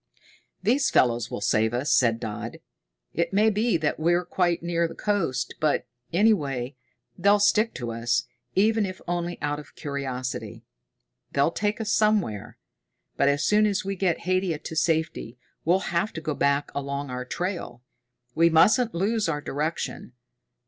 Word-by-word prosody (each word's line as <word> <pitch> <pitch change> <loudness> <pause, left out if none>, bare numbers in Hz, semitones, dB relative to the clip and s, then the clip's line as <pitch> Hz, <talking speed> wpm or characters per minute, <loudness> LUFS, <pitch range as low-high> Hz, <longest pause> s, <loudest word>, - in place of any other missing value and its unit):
"These 255 +8 +3
fellows 120 -1 +2
will - - -5
save 110 +3 +2
us," 135 +5 0
said 115 -2 +3
Dodd. 115 0 -5 0.6
"It 170 +3 -1
may 215 +2 +4
be 215 -1 +1
that 155 -1 -1
we're 175 +2 +2
quite 175 -2 0
near 170 0 +1
the 165 - -10
coast, 165 -12 -1
but, 155 -2 +1 0.3
any 210 +6 +5
way, 135 - -3 0.4
they'll 200 +1 +5
stick 215 +2 +3
to 120 -2 -4
us, 115 +1 0 0.3
even 220 +2 +3
if 185 0 -7
only 175 0 -2
out 145 0 -1
of 150 - -13
curiosity. 135 -3 -5 0.7
They'll 140 +4 +3
take 210 +4 -1
us 225 -1 -2
somewhere. 210 - +1 0.6
But 140 - +3
as 145 +2 +1
soon 210 +1 +4
as 205 -1 -1
we 195 0 -2
get 180 -3 0
Haidia 185 -2 0
to 160 - -6
safety 160 -7 0 0.3
we'll 185 +2 +1
have 170 +5 +1
to - - -4
go 155 -1 -2
back 140 +1 +1
along 140 -1 -4
our 125 0 -3
trail. 175 -4 -4 0.5
We 165 +4 +4
mustn't 215 +7 +4
lose 205 +2 +1
our 150 -2 -1
direction. 145 -2 -4
165 Hz, 160 wpm, -26 LUFS, 140-195 Hz, 0.7 s, any